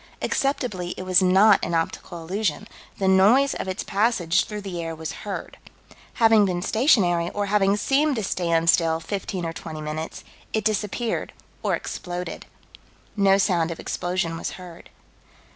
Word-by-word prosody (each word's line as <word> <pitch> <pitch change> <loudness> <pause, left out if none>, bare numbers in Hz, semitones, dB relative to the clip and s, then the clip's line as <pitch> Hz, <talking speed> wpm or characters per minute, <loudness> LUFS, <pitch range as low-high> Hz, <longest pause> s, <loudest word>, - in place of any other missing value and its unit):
Acceptably 220 -10 -1
it - - -5
was 185 0 +4
not 190 +3 +5
an 170 - -1
optical 165 +1 -3
illusion 210 +4 -2 0.3
the 195 - 0
noise 210 +9 +5
of - - -5
its 185 +2 -3
passage 195 -5 +1
through 210 -1 -6
the 185 -4 -5
air 165 -1 -4
was 160 0 -5 0.2
heard. - - -6 0.6
Having 225 -3 +5
been 180 -2 -2
stationary, 185 - +3
or 205 0 0
having 200 0 +2
seemed 280 +5 +2
to 220 - -2
stand 170 -3 0
still 165 -1 +1
fifteen 190 0 -4
or 165 - -3
twenty 160 -1 -7
minutes, 155 +1 -5 0.3
it 220 -1 -1
disappeared, 215 +2 -1 0.3
or - - +1
exploded. 180 -1 -6 0.7
No 195 -2 +4
sound 180 -4 +1
of 165 - -6
explosion 175 -2 -2
was - - -4
heard. 175 -2 -12
190 Hz, 155 wpm, -24 LUFS, 170-210 Hz, 0.7 s, not